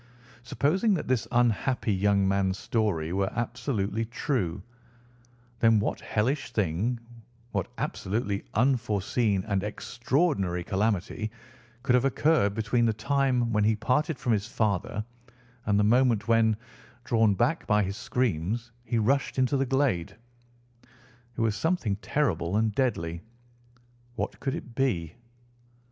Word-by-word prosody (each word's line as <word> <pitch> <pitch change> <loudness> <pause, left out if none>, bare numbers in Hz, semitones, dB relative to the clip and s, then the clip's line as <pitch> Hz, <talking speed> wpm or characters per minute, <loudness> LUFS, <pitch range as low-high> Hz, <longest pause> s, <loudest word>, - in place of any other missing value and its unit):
Supposing 185 - +1
that - - -4
this 120 -3 0
unhappy 120 -1 +1
young 100 0 +2
man's 95 -1 +1
story 100 -7 -1
were 95 +1 0
absolutely 115 -3 -2
true, 110 - -2 1.0
then 115 -2 +5
what 105 - -2
hellish 125 +6 -1
thing, 105 +4 0 0.5
what 95 -3 -1
absolutely 100 0 -2
unforeseen 110 -4 +1
and 100 -2 0
extraordinary 115 - -1
calamity 105 +2 -1 0.5
could 130 - +2
have 125 0 +4
occurred 135 -7 +2
between 115 +2 +1
the 110 - +2
time 125 0 +1
when 105 0 +3
he 110 +1 +3
parted 140 +7 0
from 120 -1 0
his 105 0 -1
father, 105 -1 -1 0.6
and 100 -1 +3
the - - +4
moment 115 -1 +3
when, 115 -2 +3 0.5
drawn 110 -4 +3
back 125 - 0
by 105 0 +3
his 100 +1 -3
screams, 115 0 -1
he 120 0 -1
rushed 130 +7 +1
into 130 +2 +2
the 135 -1 +1
glade? 130 - 0 1.2
It - - -1
was 110 -2 +1
something 160 - 0
terrible 100 - 0
and 110 -1 +1
deadly. 85 -10 -1 0.9
What - - -4
could 135 -1 -2
it 120 - -8
be? 90 - 0
110 Hz, 130 wpm, -27 LUFS, 100-125 Hz, 1.2 s, then